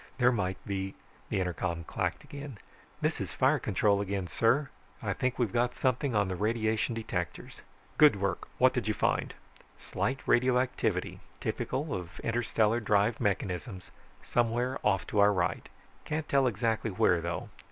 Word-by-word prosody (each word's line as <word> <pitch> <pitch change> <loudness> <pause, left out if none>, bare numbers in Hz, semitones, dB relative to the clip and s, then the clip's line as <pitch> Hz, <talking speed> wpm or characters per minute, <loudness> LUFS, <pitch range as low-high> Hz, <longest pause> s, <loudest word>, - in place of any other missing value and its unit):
There 125 -1 +5
might 95 -5 -1
be 95 -1 -3 0.2
..." - - -29
The - - 0
intercom 90 -2 -2
clacked. - - -3 0.8
"This - - 0
is - - -4
fire - - +3
control 100 -1 +2
again, 100 -1 -2
sir. 125 - +2 0.3
I - - -2
think 130 0 -1
we've 115 -6 0
got 120 +1 +1
something 130 -1 0
on 105 -2 +3
the 95 - -2
radiation 110 +3 0
detectors." 115 -1 -4 0.4
"Good 150 -6 +8
work, 100 -1 -2
what - - +5
did - - -2
you - - +1
find?" - - 0 0.4
"Slight 130 +1 -2
radioactivity, 125 -6 +1 0.2
typical 145 +2 -2
of 90 -2 -6
interstellar 115 -1 +1
drive 105 +1 +2
mechanisms, 95 -1 -2 0.3
somewhere 120 +2 0
off 95 -3 +2
to 105 - -1
our 100 0 +6
right. 90 -3 -1 0.3
Can't 155 0 -3
tell 135 -2 +3
exactly 115 0 0
where, 90 -3 +3
though." 85 0 -4
110 Hz, 150 wpm, -30 LUFS, 95-125 Hz, 0.8 s, Good